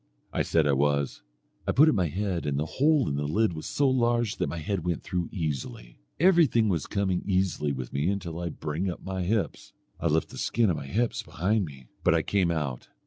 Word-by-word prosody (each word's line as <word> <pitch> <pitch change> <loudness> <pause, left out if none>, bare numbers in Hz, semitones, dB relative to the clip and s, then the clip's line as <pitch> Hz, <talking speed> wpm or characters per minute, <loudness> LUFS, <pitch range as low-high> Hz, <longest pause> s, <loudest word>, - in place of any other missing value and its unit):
I - - +1
said 80 -2 +2
I 70 - +3
was. 70 0 +1 0.5
I - - +3
put 150 +4 +6
up 155 - +5
my 90 -3 +1
head, 90 -1 -2
and 70 -1 0
the 75 - 0
hole 145 - +2
in 70 -1 -1
the 75 0 -1
lid 105 +5 +2
was 80 - -6
so 145 - +1
large, 120 -3 +1
that - - -1
my 85 - -4
head 85 +2 -2
went 85 -1 -2
through 90 -2 -2
easily. 70 - -4 0.2
Everything 160 - +4
was 85 -6 -1
coming 95 -3 0
easily 90 -6 0
with 65 -3 -5
me 70 +4 0
till 85 -3 -6
I 85 - -3
began 85 - -3
to - - -26
bring 80 +5 -1
up 90 - -6
my 95 -1 -3
hips. 100 +4 -2 0.3
I 85 - 0
left 80 0 +1
the - - -9
skin 115 -5 +2
of 80 - -1
my 70 - -6
hips 115 - 0
behind 100 +4 0
me, 65 -4 -11 0.2
but - - +4
I - - +2
came 95 -4 +1
out. 75 -7 -2
90 Hz, 235 wpm, -27 LUFS, 75-105 Hz, 0.5 s, put